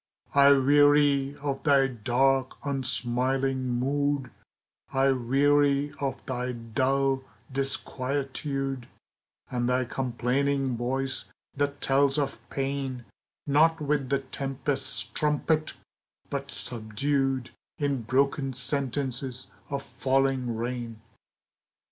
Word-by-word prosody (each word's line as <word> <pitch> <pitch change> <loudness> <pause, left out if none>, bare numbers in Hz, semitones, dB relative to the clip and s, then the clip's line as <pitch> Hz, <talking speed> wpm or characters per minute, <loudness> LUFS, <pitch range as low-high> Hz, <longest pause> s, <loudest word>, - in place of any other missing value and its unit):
I 140 0 +7
weary 145 0 +4
of 140 -2 -2
thy 140 -2 +4
dark, 130 +2 +1
unsmiling 130 0 0
mood, 140 +2 0 0.6
I 135 0 +3
weary 140 +3 +2
of 135 -2 -3
thy 125 -1 -2
dull 130 +3 0 0.3
disquietude, 135 0 -2 0.6
And 120 -1 0
thy 125 0 +2
complaining 130 +2 0
voice 130 +3 -1 0.3
that 145 0 -1
tells 135 +1 +3
of 145 -2 -1
pain, 135 -3 -3 0.4
Not 160 +3 +4
with 145 -3 0
the 140 - +3
tempest's 135 +1 -2
trumpet, 155 +1 0 0.6
but 140 0 -3
subdued 130 +3 -1 0.3
In 140 -3 0
broken 135 +3 +1
sentences 130 -1 -3 0.2
of 140 -1 -3
falling 130 -3 0
rain. 120 -1 -4
135 Hz, 95 wpm, -27 LUFS, 130-140 Hz, 0.6 s, I